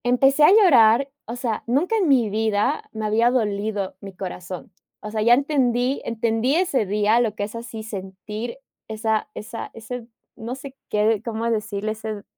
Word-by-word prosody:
Empecé 270 +4 +4
a 300 - +8
llorar, 275 - +6 0.2
o 235 - -5
sea, 240 -3 -2
nunca 295 - +1
en 400 -6 +2
mi 250 -6 +4
vida, 215 -1 0
me 220 -1 -4
había 225 +3 +3
dolido 210 -4 -1
mi 195 -1 -9
corazón, 180 -1 -7 0.3
o 210 - -7
sea, 215 0 -1
ya 235 +2 +6
entendí 260 -2 +1
entendí 230 +3 0
ese 325 - +1
día 210 +3 +3
lo 220 -3 0
que 205 - -3
es 205 - -5
así 230 -1 -7
sentir 210 +3 -6 0.3
esa 220 0 -1
esa 230 +2 -6
ese, 230 +1 -7 0.3
no 235 +3 -5
sé 270 0 -10
qué, 210 0 +2
cómo 230 -1 -2
decirle 215 -1 -2
ese 215 -1 -6
225 Hz, 170 wpm, -23 LUFS, 210-245 Hz, 0.3 s, a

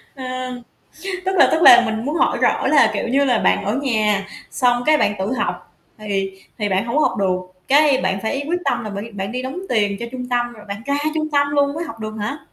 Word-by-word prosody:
Ờ, 255 -1 -5 0.8
tức 380 0 -1
là - - +6
tức 320 - +2
là 240 - +9
mình 220 +1 -3
muốn 290 +3 -2
hỏi - - +1
rõ - - +1
là, - - +5
kiểu - - -2
như 275 +3 +2
là, 250 -4 +2
bạn - - +1
ở 205 +4 -1
nhà 215 -6 +1 0.3
xong 245 -2 +1
cái 310 0 +5
bạn 210 - +1
tự 195 +5 -2
học 180 -8 -3 0.3
thì 200 -2 -2 0.3
thì 210 -2 -1
bạn 190 +2 0
hông 235 +3 -3
có 305 - +4
học - - +1
được, 190 -2 +1 0.3
cái, 285 -1 +4
bạn 190 +1 -1
phải 275 +6 -2
quyết 350 - +1
tâm - - -1
là 215 - -5
bạn 200 +1 -5
đi 230 - -10
bạn 195 0 -5
đi 250 +1 -3
đóng 265 +7 -5
tiền 205 -3 +1
cho 235 - -4
trung 250 -1 -6
tâm, 240 -1 -1
rồi 215 -3 -14
bạn 200 +2 -6
ra 280 0 0 0.2
trung 310 -1 -2
tâm 285 0 +3
luôn 285 0 +1
mới 330 +2 -3
học 230 -8 -9
được 215 0 -5
hả? 215 +8 -3
240 Hz, 255 wpm, -20 LUFS, 210-280 Hz, 0.8 s, là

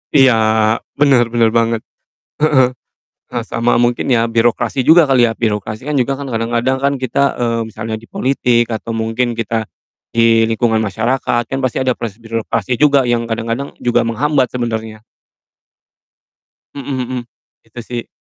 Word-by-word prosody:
Iya, 135 -3 +6 0.7
benar 135 -5 +4
benar 115 -1 +2
banget. 115 -1 +1 0.6
Heeh. 130 -4 +3 0.6
Eh, - - -4
sama 120 +1 +1
mungkin 120 +2 +1
ya 115 -2 +3
birokrasi 115 +2 +1
juga 160 +4 +6
kali 130 -3 +3
ya. 115 - -6
Birokrasi 110 +1 -2
kan 150 - -2
juga 135 +2 -2
kan 140 - -6
kadang-kadang 120 +3 0
kan 140 0 +2
kita, 130 0 -1 0.2
eee, 115 -1 0
misalnya 110 +1 -5
di 115 - -17
politik 125 -3 +1
atau 110 +1 -6
mungkin 115 +1 -1
kita, 110 -1 -2 0.4
di 115 -1 +3
lingkungan 115 0 +1
masyarakat, 120 +3 0
kan 135 +2 -4
pasti 130 -2 -1
ada 125 - +2
proses 115 -4 -6
birokrasi 115 0 -3
juga, 140 -3 +4
yang 115 -1 -1
kadang-kadang 115 +4 -3
juga 120 - +1
menghambat 130 +3 0
sebenarnya. 110 -3 -4 1.7
Mhm 140 -1 -4
mhm, 130 - -3 0.5
itu 115 +2 -10
sih. 120 -1 -6
120 Hz, 150 wpm, -16 LUFS, 115-130 Hz, 1.7 s, Iya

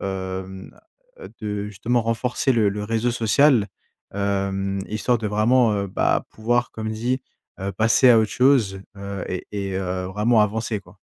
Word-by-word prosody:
hem, 95 0 -6 0.4
heu, 475 - -9
de 105 -2 -3
justement 115 +4 -1
renforcer 120 +4 0
le 110 -4 +3
le 105 +1 -3
réseau 115 +2 0
social, 120 0 +3 0.5
hem, 100 -1 -1
histoire 115 +3 0
de 110 - -3
vraiment, 110 +3 +3
heu, 100 0 -1
bah, 95 - +1
pouvoir 120 +2 0
comme 110 0 -5
dit, 125 +4 -1 0.4
heu, 100 +1 -3
passer 115 +5 +4
à 115 - +7
autre 110 -1 +1
chose, 125 -7 +3 0.2
heu 100 -1 -5
et 90 - -4
et 100 -2 -4
heu, 90 -1 -2
vraiment 105 +4 +2
avancer 110 +1 0
quoi. - - -19
105 Hz, 160 wpm, -23 LUFS, 100-115 Hz, 0.5 s, à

